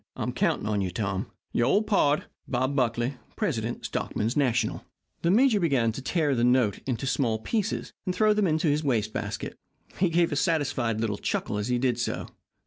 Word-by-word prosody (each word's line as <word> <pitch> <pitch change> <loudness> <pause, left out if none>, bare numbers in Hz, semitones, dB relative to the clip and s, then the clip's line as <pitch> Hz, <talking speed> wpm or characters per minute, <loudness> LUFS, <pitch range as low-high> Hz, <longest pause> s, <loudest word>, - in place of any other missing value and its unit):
I'm - - -3
counting - - 0
on 105 -2 0
you, 95 - -1
Tom. 95 +1 -2 0.3
Your 120 - +2
Old 205 +10 +3
Pard, 150 -9 +2 0.2
BOB 130 +2 0
BUCKLY, 120 0 0 0.2
Prest. - - 0 0.2
Stockmen's 115 +4 -2
National. 125 -6 +1 0.4
The 170 - +1
major 225 +2 +5
began 135 -10 +2
to 125 - -6
tear 150 +1 +1
the 120 -2 +1
note 125 -4 +3
into 125 0 -2
small 120 -5 +1
pieces 210 - -2
and 180 - 0
throw 215 -1 +4
them 210 -2 +2
into 160 0 +1
his 150 +1 +2
waste 110 -6 0
basket. - - -4 0.4
He 185 -1 +3
gave 170 0 +2
a - - 0
satisfied 135 -8 0
little 110 -3 -1
chuckle 105 - -2
as 105 - -2
he 125 0 +1
did 120 -1 +1
so. 115 - -2
130 Hz, 190 wpm, -27 LUFS, 115-160 Hz, 0.4 s, major